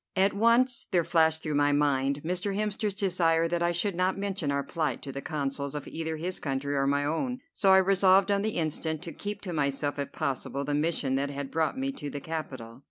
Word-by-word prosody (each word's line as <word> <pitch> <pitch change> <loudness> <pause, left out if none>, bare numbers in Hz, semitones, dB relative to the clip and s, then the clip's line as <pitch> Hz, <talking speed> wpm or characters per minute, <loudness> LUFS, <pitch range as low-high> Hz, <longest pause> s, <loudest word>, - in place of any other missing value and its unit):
At 195 +1 +3
once 235 +4 +3
there 175 -3 +2
flashed 160 -1 +2
through 155 - -2
my 145 0 +3
mind 140 -1 +1
Mr. 185 +3 -1
Hemster's 210 -1 -1
desire 170 -5 +2
that 170 0 -1
I 170 0 +2
should 180 +4 0
not 185 +2 0
mention 195 -7 -2
our 140 0 0
plight 155 -6 -2
to 135 - -5
the 140 - -5
Consuls 140 -1 -3
of 145 - -5
either 160 0 -4
his 180 +4 -3
country 140 0 -2
or 135 0 +1
my 145 +1 +1
own, 250 - -1
so 195 - +2
I 190 - +8
resolved 195 +1 +4
on 200 0 +2
the 215 +1 -2
instant 160 0 -2
to 170 - -6
keep 205 +2 -6
to 180 -4 -5
myself, 145 -1 -1
if 140 0 -3
possible, 140 -1 -3
the 145 - -1
mission 150 -3 0
that 140 +1 -1
had 140 -1 -5
brought 160 +8 0
me 270 +1 -1
to 145 - -6
the 145 - -5
capital. 130 -7 -6
160 Hz, 225 wpm, -28 LUFS, 145-190 Hz, -, I